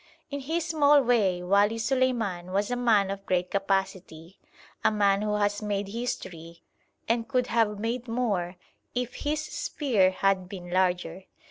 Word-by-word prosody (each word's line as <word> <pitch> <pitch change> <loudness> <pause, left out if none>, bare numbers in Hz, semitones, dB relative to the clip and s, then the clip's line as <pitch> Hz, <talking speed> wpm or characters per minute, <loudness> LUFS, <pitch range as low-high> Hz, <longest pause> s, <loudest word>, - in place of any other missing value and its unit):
In 285 - -3
his 320 +4 -2
small 295 -3 +4
way 200 -8 +2
Wali 200 +4 +3
Suleiman 225 -7 0
was 205 +4 0
a - - +1
man 220 -5 +2
of 195 0 -6
great 180 0 0
capacity; 190 -3 -2 0.4
a - - +4
man 200 -2 +2
who 210 0 0
has 205 0 0
made 205 -1 -2
history, 180 -8 -6 0.4
and 230 0 0
could 255 -2 +1
have 225 -3 +1
made 230 +4 -3
more 205 -7 -1 0.4
if 245 0 -2
his 300 +1 -2
sphere 230 - +1
had 190 -1 0
been 180 -3 -8
larger. 180 0 0
205 Hz, 150 wpm, -27 LUFS, 190-245 Hz, 0.4 s, small